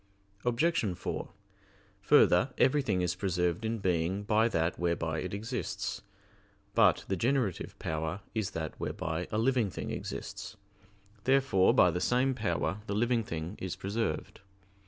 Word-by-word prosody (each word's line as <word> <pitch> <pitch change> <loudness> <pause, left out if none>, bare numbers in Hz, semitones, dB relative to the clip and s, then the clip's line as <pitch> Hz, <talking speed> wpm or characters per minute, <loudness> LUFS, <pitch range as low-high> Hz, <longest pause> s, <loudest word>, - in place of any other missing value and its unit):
Obj. 120 - +1
4: - - -4 0.7
Further, 140 +4 +5
everything 130 -8 +3
is 90 -1 +1
preserved 90 0 -1
in 115 +1 -1
being 95 0 0
by 110 +2 +3
that 80 -5 0
whereby 85 -2 0
it 90 - -4
exists. 110 +5 -3 0.7
But 100 -7 +4
the 95 - 0
generative 120 -2 0
power 80 +4 -3
is 110 -4 -1
that 80 -1 -3
whereby 80 +2 -3
a 105 - 0
living 120 -2 +2
thing - - -5
exists. - - -6 0.7
Therefore 130 -8 +4
by 90 - +6
the 90 - -2
same 130 +4 +2
power 105 -3 -1
the 100 - -2
living 120 +1 +2
thing 85 0 -5
is 95 -2 -4
preserved. 100 -5 -3
100 Hz, 135 wpm, -31 LUFS, 85-115 Hz, 0.7 s, by